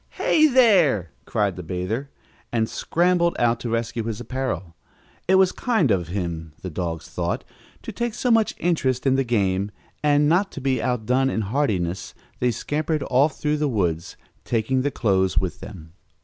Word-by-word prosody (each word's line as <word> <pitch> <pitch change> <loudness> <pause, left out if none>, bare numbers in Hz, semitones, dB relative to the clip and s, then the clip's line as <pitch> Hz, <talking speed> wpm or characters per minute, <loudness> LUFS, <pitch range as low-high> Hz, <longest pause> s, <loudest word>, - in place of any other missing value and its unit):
"Hey 310 -1 +4
there!" 185 - +4
cried 100 -4 0
the - - -5
bather, 90 - -3 0.4
and 115 -2 +1
scrambled 170 +4 +1
out 120 0 +2
to 120 - -4
rescue 115 0 -2
his 115 -2 -3
apparel. 120 -9 -4 0.5
It 190 - +5
was 190 -1 +5
kind 220 - +1
of 90 -4 +1
him, 85 -4 -4
the 90 - -5
dogs 85 0 -4
thought, 90 -1 -3 0.4
to - - -6
take 240 -2 -3
so 250 - 0
much 225 -2 +3
interest 140 -8 0
in 135 - +4
the 135 0 +2
game, 100 -5 0 0.3
and, 145 0 +3
not 180 +6 +2
to - - -6
be 135 -1 0
outdone 125 +2 +1
in 110 - -1
heartiness, 95 -7 -1 0.2
they 125 - +2
scampered 150 +5 -1
off 135 +3 +3
through 150 0 0
the 150 0 0
woods, 85 -8 -1 0.3
taking 120 +3 0
the 145 - 0
clothes 95 -7 +1
with 95 -2 0
them. 80 -6 -11
120 Hz, 170 wpm, -23 LUFS, 95-150 Hz, 0.5 s, It